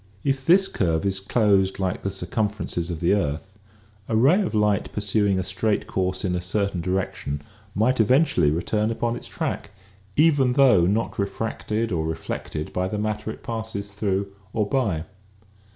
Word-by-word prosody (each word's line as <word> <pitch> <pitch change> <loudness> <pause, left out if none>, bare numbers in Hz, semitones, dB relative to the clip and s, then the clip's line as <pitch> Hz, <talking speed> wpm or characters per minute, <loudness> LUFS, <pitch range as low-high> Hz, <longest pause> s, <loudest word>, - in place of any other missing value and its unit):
If 135 -1 -1
this 190 +3 +6
curve 80 -2 0
is 95 -1 0
closed 100 -2 +2
like 95 -2 -1
the 95 - -1
circumferences 95 -2 -2
of 85 -2 -4
the 85 - +3
earth 95 +2 -2 0.5
a 115 - +1
ray 140 - +5
of 180 - -2
light 105 -1 +2
pursuing 100 -1 +1
a 95 - 0
straight 95 +3 0
course 95 0 -1
in 90 - 0
a 90 - -1
certain 95 0 -1
direction 90 -5 -2 0.3
might 120 +5 +2
eventually 125 - +4
return 105 +7 0
upon 115 +1 -1
its - - -7
track, - - -3 0.5
even 145 -5 +4
though 125 -11 +5
not 105 +3 -1
refracted 110 +2 -2
or 80 -3 0
reflected 80 -1 -4
by 90 0 0
the 105 - -3
matter 105 +1 -2
it - - -8
passes 110 -3 -5
through 100 -1 -1 0.2
or 105 -2 0
by. 105 - 0
100 Hz, 165 wpm, -24 LUFS, 95-110 Hz, 0.5 s, this